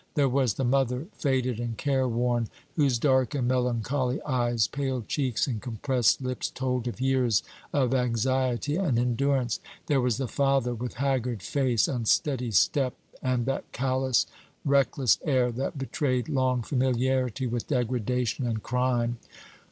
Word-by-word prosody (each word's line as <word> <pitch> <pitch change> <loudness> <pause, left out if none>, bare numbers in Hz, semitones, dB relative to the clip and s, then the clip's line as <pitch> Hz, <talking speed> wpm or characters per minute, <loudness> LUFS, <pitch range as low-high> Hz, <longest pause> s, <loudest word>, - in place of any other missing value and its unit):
There 145 -3 +3
was 130 -4 +1
the 135 - -2
mother, 130 +1 +1
faded 130 -5 0
and 120 -2 -3
care 135 -1 +1
worn, 120 -1 0 0.3
whose 140 -6 +2
dark 130 +2 +2
and 125 -3 0
melancholy 125 +1 0
eyes, 120 -5 +1
pale 135 -3 -2
cheeks, 130 -6 0
and 115 -6 -3
compressed 125 0 +1
lips 125 0 -2
told 125 -2 -2
of 120 - -5
years 130 -5 +2 0.3
of 130 -3 +1
anxiety 130 +3 0
and 165 -11 +1
endurance. 125 0 +1 0.3
There 140 -3 +2
was 125 -3 +1
the 135 - -2
father, 135 -2 +1
with 120 +1 -5
haggard 125 -5 -1
face, 130 -6 +1
unsteady 125 +1 +1
step, 130 +4 +2 0.3
and 125 -2 0
that 135 +1 -3
callous, 130 -1 +1 0.4
reckless 140 -2 +3
air, 130 -5 +2
that 135 +6 -3
betrayed 130 -2 -1
long 130 -4 +1
familiarity 130 -1 0
with 120 -1 -3
degradation 125 -1 -1
and 110 -2 -2
crime. 120 -1 0
125 Hz, 145 wpm, -27 LUFS, 120-135 Hz, 0.4 s, There